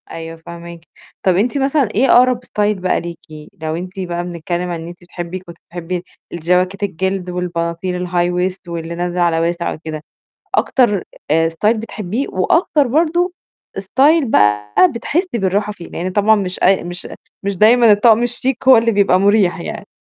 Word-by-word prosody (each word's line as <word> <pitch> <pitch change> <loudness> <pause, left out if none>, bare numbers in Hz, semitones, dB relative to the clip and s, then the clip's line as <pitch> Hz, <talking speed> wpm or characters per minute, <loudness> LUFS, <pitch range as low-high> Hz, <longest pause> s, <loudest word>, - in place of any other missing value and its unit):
أيوه، 165 0 -7
فاهماكِ، 170 0 -9 0.4
طَب 185 -2 +3
أنتِ 235 +9 +1
مثلًا 275 -2 +1
إيه 250 +6 +3
أقرب 250 0 +3
ستايل 210 -3 -1
بقى 185 - +1
ليكِ، 165 -2 -10
لو 155 0 -2
أنتِ 180 +3 -7
بقى 175 -2 -3
بنتكلّم 175 +1 -4
ع 175 - -2
إن 165 0 -7
أنتِ 175 +1 -11
بتحبّي 175 +1 -6
كنتِ 170 -2 -13
بتحبي 175 +1 -5 0.3
الجواكت 180 +4 0
الجلد 190 0 -2
والبناطيل 180 0 -3
الhigh 175 0 0
waist 180 +1 -1
واللي 170 0 -5
نازلة 175 +1 -2
على 170 -2 +2
واسع 170 +1 -1
وكده، 155 -1 -7 0.5
أكتر 210 -8 +2 0.3
آآ، 165 +1 +3
ستايل 210 +8 0
بتحبّيه 220 +3 -4
وأكتر 290 - +2
برضه 335 +7 +1 0.5
ستايل 275 +11 +3
بقى 105 - +3
بتحسّي 300 +5 -2
بالراحة 200 +2 0
فيه، 175 -4 -11
لإن 185 +2 -4
طبعًا 210 +2 +4
مش 185 -3 -4
أي 190 0 +3
مش 175 +1 -7 0.3
مش 200 0 -2
دايمًا 225 +3 +6
الطَقم 220 +2 +4
الشيك 245 +2 -2
هو 260 - +9
اللي 230 +1 +3
بيبقى 200 -3 +3
مُريح 200 -3 +3
يعني؟ 200 - -6
185 Hz, 165 wpm, -17 LUFS, 170-215 Hz, 0.5 s, هو